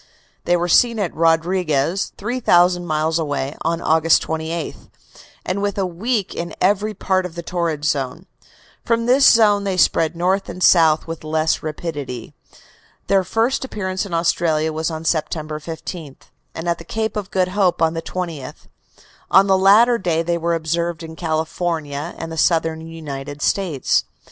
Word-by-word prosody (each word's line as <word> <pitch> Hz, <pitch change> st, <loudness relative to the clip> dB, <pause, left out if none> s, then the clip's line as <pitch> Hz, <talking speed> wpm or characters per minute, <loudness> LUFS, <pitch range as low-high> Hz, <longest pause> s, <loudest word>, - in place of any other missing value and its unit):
They 175 Hz, 0 st, +3 dB
were 175 Hz, +1 st, -1 dB
seen 230 Hz, +6 st, +4 dB
at 200 Hz, -5 st, -2 dB
Rodriguez, 165 Hz, 0 st, +1 dB
3,000 180 Hz, -6 st, +2 dB
miles 155 Hz, +1 st, 0 dB
away, 145 Hz, -2 st, -2 dB
on 165 Hz, +1 st, -1 dB
August 160 Hz, +1 st, +3 dB
28, 160 Hz, 0 st, -4 dB, 0.7 s
and 190 Hz, +2 st, -2 dB
within 200 Hz, -1 st, -1 dB
a -, -, 0 dB
week 200 Hz, +4 st, -2 dB
in 170 Hz, 0 st, -5 dB
every 205 Hz, +3 st, +1 dB
part 185 Hz, 0 st, 0 dB
of 180 Hz, -2 st, -7 dB
the 170 Hz, -, -6 dB
torrid 165 Hz, -4 st, -2 dB
zone. 140 Hz, +4 st, -2 dB, 0.6 s
From 230 Hz, 0 st, 0 dB
this 260 Hz, +3 st, +6 dB
zone 210 Hz, -3 st, +4 dB
they 195 Hz, -2 st, -2 dB
spread 165 Hz, -2 st, +2 dB
north 185 Hz, +3 st, 0 dB
and 185 Hz, -, -4 dB
south 160 Hz, -3 st, +5 dB
with 165 Hz, -1 st, -7 dB
less 155 Hz, +1 st, 0 dB
rapidity. 145 Hz, -6 st, -6 dB, 0.7 s
Their 195 Hz, -1 st, +2 dB
first 225 Hz, +8 st, 0 dB
appearance 190 Hz, -6 st, -3 dB
in 200 Hz, -, -8 dB
Australia 160 Hz, -2 st, +1 dB
was 160 Hz, +1 st, -1 dB
on 160 Hz, 0 st, -6 dB
September 155 Hz, -1 st, -2 dB
15th, 160 Hz, -2 st, -8 dB, 0.3 s
and 165 Hz, +2 st, -5 dB
at 170 Hz, -1 st, 0 dB
the -, -, -9 dB
Cape 220 Hz, +5 st, -3 dB
of 205 Hz, -2 st, -4 dB
Good 185 Hz, -1 st, 0 dB
Hope 185 Hz, -2 st, +1 dB
on 165 Hz, 0 st, +2 dB
the 165 Hz, -, -3 dB
20th. 170 Hz, -6 st, -6 dB, 0.6 s
On 195 Hz, -, +6 dB
the 195 Hz, -1 st, +3 dB
latter 215 Hz, +6 st, +5 dB
day 165 Hz, -3 st, 0 dB
they 170 Hz, +1 st, 0 dB
were 170 Hz, +1 st, 0 dB
observed 170 Hz, +1 st, -2 dB
in 160 Hz, 0 st, -9 dB
California 160 Hz, -2 st, -3 dB
and 165 Hz, 0 st, -6 dB
the 165 Hz, -, -6 dB
Southern 160 Hz, -1 st, +1 dB
United 145 Hz, -3 st, -7 dB
States. 175 Hz, -9 st, +1 dB
170 Hz, 165 wpm, -20 LUFS, 160-190 Hz, 0.7 s, this